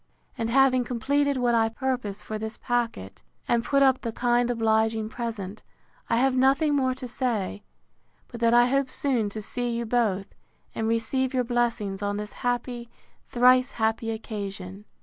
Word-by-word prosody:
And 225 Hz, 0 st, -2 dB
having 255 Hz, 0 st, +4 dB
completed 280 Hz, +4 st, 0 dB
what 245 Hz, -1 st, +2 dB
I 225 Hz, -1 st, +3 dB
purpose 245 Hz, -4 st, -3 dB
for 215 Hz, 0 st, -5 dB
this 220 Hz, +1 st, -5 dB
packet, 230 Hz, -, -3 dB, 0.3 s
and 235 Hz, -1 st, +2 dB
put 275 Hz, +1 st, +3 dB
up 265 Hz, -1 st, +4 dB
the 230 Hz, -, -3 dB
kind 240 Hz, +1 st, +1 dB
obliging 220 Hz, -1 st, +1 dB
present, 220 Hz, -4 st, -5 dB, 0.5 s
I -, -, +2 dB
have 260 Hz, +2 st, +2 dB
nothing 275 Hz, +4 st, +3 dB
more 260 Hz, -2 st, +1 dB
to 255 Hz, -1 st, -7 dB
say, 225 Hz, -6 st, -2 dB, 0.7 s
but 235 Hz, -, -9 dB
that 230 Hz, 0 st, +3 dB
I 240 Hz, 0 st, +6 dB
hope 270 Hz, +1 st, +1 dB
soon 245 Hz, -7 st, 0 dB
to 215 Hz, +1 st, -7 dB
see 245 Hz, +3 st, -3 dB
you 235 Hz, 0 st, -2 dB
both, 220 Hz, -5 st, 0 dB, 0.4 s
and 220 Hz, -, -2 dB
receive 250 Hz, +4 st, 0 dB
your 250 Hz, -, +2 dB
blessings 235 Hz, -5 st, -1 dB
on 205 Hz, 0 st, -1 dB
this 210 Hz, 0 st, -6 dB
happy, 245 Hz, -1 st, -2 dB, 0.4 s
thrice 255 Hz, +2 st, +4 dB
happy 225 Hz, 0 st, 0 dB
occasion. 200 Hz, -3 st, -6 dB
235 Hz, 165 wpm, -26 LUFS, 220-255 Hz, 0.7 s, I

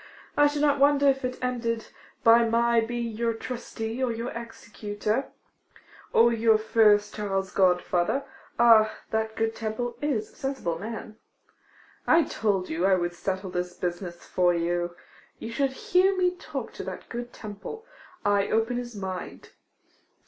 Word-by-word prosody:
I 290 Hz, 0 st, +6 dB
should 290 Hz, 0 st, -1 dB
not 285 Hz, -1 st, +3 dB
wonder 285 Hz, 0 st, +5 dB
if 270 Hz, -1 st, +2 dB
it 255 Hz, 0 st, -2 dB
ended 230 Hz, -3 st, -2 dB, 0.3 s
by 230 Hz, 0 st, +7 dB
my 235 Hz, +1 st, +3 dB
being 235 Hz, 0 st, -3 dB
your 230 Hz, 0 st, 0 dB
trustee, 230 Hz, 0 st, -5 dB
or 250 Hz, -, +1 dB
your 230 Hz, +2 st, -4 dB
executor, 225 Hz, 0 st, -4 dB, 0.8 s
or 235 Hz, +1 st, +5 dB
your 225 Hz, -1 st, +4 dB
first 215 Hz, -1 st, +3 dB
child's 195 Hz, -2 st, -2 dB
godfather. 180 Hz, +5 st, +2 dB, 0.3 s
Ah, 220 Hz, -2 st, +6 dB, 0.2 s
that 220 Hz, 0 st, -1 dB
good 225 Hz, 0 st, -1 dB
Temple 225 Hz, +2 st, -4 dB
is 255 Hz, -8 st, -1 dB
a -, -, -24 dB
sensible 260 Hz, -12 st, -3 dB
man. 220 Hz, 0 st, -7 dB, 0.9 s
I 330 Hz, +1 st, +6 dB
told 200 Hz, -9 st, -1 dB
you 160 Hz, +3 st, -2 dB
I 190 Hz, 0 st, +5 dB
would 175 Hz, -1 st, -1 dB
settle 190 Hz, +1 st, -3 dB
this 180 Hz, 0 st, -3 dB
business 175 Hz, -1 st, -5 dB
for 175 Hz, -1 st, +2 dB
you. 175 Hz, +1 st, -1 dB, 0.4 s
You 225 Hz, -, -7 dB
should 275 Hz, +3 st, 0 dB
hear 370 Hz, +7 st, +2 dB
me 360 Hz, -1 st, +2 dB
talk -, -, -6 dB
to -, -, -6 dB
that -, -, -7 dB
good 240 Hz, 0 st, -6 dB
Temple. 215 Hz, -, -8 dB, 0.4 s
I 200 Hz, 0 st, +3 dB
open 225 Hz, +2 st, +1 dB
his 240 Hz, -2 st, -5 dB
mind. 190 Hz, -2 st, -6 dB
225 Hz, 150 wpm, -27 LUFS, 195-245 Hz, 0.9 s, by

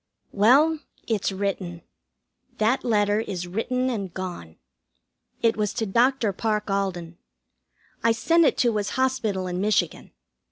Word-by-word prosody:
Well, 280 Hz, +10 st, +4 dB, 0.3 s
it's 215 Hz, -3 st, 0 dB
written. 190 Hz, -3 st, -3 dB, 0.7 s
That 225 Hz, +5 st, +1 dB
letter 210 Hz, -2 st, +2 dB
is 185 Hz, -5 st, -4 dB
written 240 Hz, +7 st, -1 dB
and 200 Hz, -6 st, -4 dB
gone. 175 Hz, -, -7 dB, 0.9 s
It 230 Hz, -1 st, +3 dB
was 210 Hz, -1 st, -1 dB
to 225 Hz, -, -1 dB
Dr. 235 Hz, +1 st, +2 dB
Parke 210 Hz, 0 st, -1 dB
Alden. 180 Hz, -4 st, -3 dB, 0.8 s
I 230 Hz, -, +4 dB
sent 330 Hz, +10 st, +3 dB
it -, -, +2 dB
to 235 Hz, -3 st, +2 dB
his 205 Hz, -1 st, -1 dB
hospital 235 Hz, -8 st, 0 dB
in 180 Hz, 0 st, -3 dB
Michigan. 210 Hz, +1 st, 0 dB
210 Hz, 130 wpm, -24 LUFS, 190-235 Hz, 0.9 s, Well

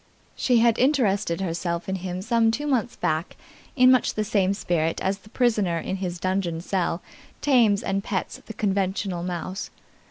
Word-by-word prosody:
She 250 Hz, -2 st, +2 dB
had 235 Hz, -1 st, +3 dB
interested 215 Hz, -, +2 dB
herself 170 Hz, -1 st, -2 dB
in 190 Hz, 0 st, -1 dB
him 185 Hz, 0 st, -5 dB
some 230 Hz, 0 st, +3 dB
two 275 Hz, +6 st, -2 dB
months 250 Hz, -5 st, 0 dB
back 160 Hz, -1 st, -2 dB, 0.4 s
in 255 Hz, -1 st, +6 dB
much 255 Hz, -, +2 dB
the 215 Hz, -, 0 dB
same 200 Hz, -2 st, +1 dB
spirit 165 Hz, -4 st, -1 dB
as 195 Hz, +1 st, -1 dB
the 210 Hz, -, -18 dB
prisoner 215 Hz, -8 st, +1 dB
in 190 Hz, +3 st, -3 dB
his 180 Hz, -2 st, -4 dB
dungeon 185 Hz, -2 st, -1 dB
cell 175 Hz, -1 st, -1 dB, 0.4 s
tames 235 Hz, -8 st, +3 dB
and 195 Hz, 0 st, -1 dB
pets 195 Hz, -2 st, -3 dB
the 220 Hz, -, -6 dB
conventional 195 Hz, -2 st, -1 dB
mouse. 180 Hz, +2 st, -4 dB
195 Hz, 165 wpm, -25 LUFS, 180-225 Hz, 0.4 s, in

